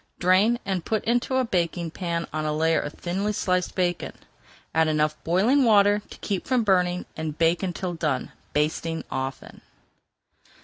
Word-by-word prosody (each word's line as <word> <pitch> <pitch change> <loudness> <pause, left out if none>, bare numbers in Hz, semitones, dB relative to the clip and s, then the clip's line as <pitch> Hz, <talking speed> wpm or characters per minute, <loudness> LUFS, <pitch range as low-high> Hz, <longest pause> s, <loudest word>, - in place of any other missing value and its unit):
Drain 190 +6 +4
and 190 -3 -1
put 220 +3 -1
into 245 +3 +1
a 260 -1 +2
baking 170 -4 -1
pan 170 -1 -3
on 155 0 -2
a 155 - -1
layer 160 +1 +3
of 145 - -5
thinly 195 +4 -2
sliced 180 -3 0
bacon. 175 -2 -1 0.6
Add 160 0 +3
enough 150 0 +1
boiling 215 +12 +3
water 205 -2 +5
to - - -11
keep 195 -3 -3
from 255 -3 +2
burning, 180 -3 +2
and 155 -1 -4
bake 165 +1 +2
until 185 -1 -3
done, 150 -6 -2 0.2
basting 160 +2 -1
often. 135 0 -5
175 Hz, 160 wpm, -25 LUFS, 160-200 Hz, 0.6 s, water